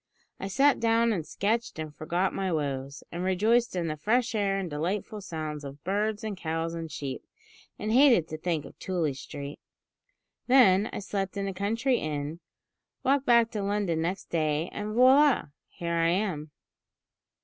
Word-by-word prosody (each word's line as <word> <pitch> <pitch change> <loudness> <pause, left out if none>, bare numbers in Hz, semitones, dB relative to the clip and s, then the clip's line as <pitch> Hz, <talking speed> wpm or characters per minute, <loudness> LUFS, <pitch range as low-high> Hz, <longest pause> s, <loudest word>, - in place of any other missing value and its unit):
I 195 - -4
sat 275 +8 +3
down 230 0 +3
and 165 -6 -3
sketched, 225 +1 -1
and 155 -1 -6
forgot 175 +4 -1
my 190 -1 -1
woes, 140 -3 -3
and 175 +1 -4
rejoiced 215 +5 +2
in 175 -2 -1
the 155 -2 -2
fresh 225 +10 +1
air 200 -2 +1
and 195 -2 -2
delightful 185 +8 -3
sounds 155 -5 -5
of 140 +1 -9
birds, 210 +3 -1
and 215 -2 -3
cows, 165 -1 -3
and 165 -1 -5
sheep, 135 -4 -5 0.5
and 215 - -3
hated 245 - +5
to 155 - -5
think 160 -3 -1
of - - -13
Tooley 170 -6 -1
Street. 140 +1 -8 0.9
Then 220 -6 +5
I - - -5
slept 195 -1 -3
in 200 0 -1
a 195 - -3
country 230 +7 0
inn, 150 +1 -4 0.6
walked 275 +1 +2
back 235 -1 +5
to 210 - -3
London 200 -5 0
next 180 +3 -3
day, 155 0 0
and, 210 +1 -4
voila! 260 - +5 0.2
here 170 -1 -4
I 165 0 +2
am!" 175 -5 -1
185 Hz, 170 wpm, -28 LUFS, 160-215 Hz, 0.9 s, hated